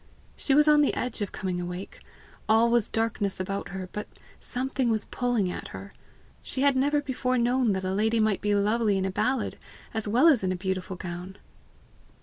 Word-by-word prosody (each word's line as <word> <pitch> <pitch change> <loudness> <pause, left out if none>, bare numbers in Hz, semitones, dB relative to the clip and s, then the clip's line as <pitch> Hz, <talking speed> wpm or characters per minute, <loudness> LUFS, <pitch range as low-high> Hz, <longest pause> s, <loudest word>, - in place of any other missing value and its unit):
She 270 - +1
was 300 +1 +5
on 300 0 +6
the 290 - +2
edge 240 -3 -3
of 205 - -2
coming 180 -2 -3
awake; 180 +2 -6 0.5
all 225 +2 +5
was 235 -2 +3
darkness 225 -4 -1
about 195 +1 -3
her, 185 0 -5
but 210 - -5 0.3
something 260 0 -2
was 220 -2 0
pulling 240 -7 0
at - - -6
her! 195 0 -9 0.5
She 260 - -3
had 280 -1 +4
never 285 +3 +2
known 290 - 0
before 255 -1 0
that 235 -5 +1
a 190 - -1
lady 220 +3 +1
might 215 -3 +2
be 205 0 +1
lovely 210 0 +2
in 190 - 0
a 190 - -1
ballad 255 +7 -1 0.3
as 220 -2 -3
well 245 +10 +4
as 275 -11 +5
in 185 - +1
a - - -1
beautiful 185 0 -3
gown! 180 +1 -7
215 Hz, 195 wpm, -27 LUFS, 190-250 Hz, 0.5 s, on